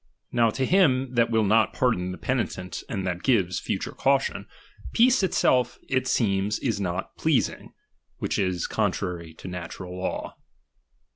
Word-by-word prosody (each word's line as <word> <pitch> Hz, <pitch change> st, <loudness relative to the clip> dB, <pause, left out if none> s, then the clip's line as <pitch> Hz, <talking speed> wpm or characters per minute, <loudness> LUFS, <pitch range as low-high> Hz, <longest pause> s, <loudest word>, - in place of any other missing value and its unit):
Now 115 Hz, -1 st, +3 dB
to 130 Hz, +4 st, -1 dB
him 135 Hz, -8 st, +3 dB
that 120 Hz, -1 st, +3 dB
will 110 Hz, -1 st, +2 dB
not 110 Hz, 0 st, +3 dB
pardon 90 Hz, -8 st, +1 dB
the 90 Hz, -, -6 dB
penitent 105 Hz, -8 st, -2 dB
and 95 Hz, -3 st, -3 dB
that 90 Hz, -1 st, -2 dB
gives 95 Hz, -9 st, +2 dB
future -, -, -3 dB
caution, -, -, 0 dB, 0.5 s
peace 245 Hz, +1 st, +5 dB
itself 130 Hz, -, +2 dB
it 130 Hz, -1 st, 0 dB
seems 100 Hz, -2 st, +1 dB
is 110 Hz, -6 st, -1 dB
not 90 Hz, 0 st, -3 dB
pleasing: 155 Hz, -5 st, 0 dB, 0.4 s
which -, -, -2 dB
is 95 Hz, -3 st, 0 dB
con -, -, +1 dB
trary 85 Hz, -3 st, -5 dB
to -, -, -15 dB
the -, -, -6 dB
natural 90 Hz, +1 st, -7 dB
law. 90 Hz, 0 st, -4 dB
105 Hz, 155 wpm, -26 LUFS, 90-130 Hz, 0.5 s, peace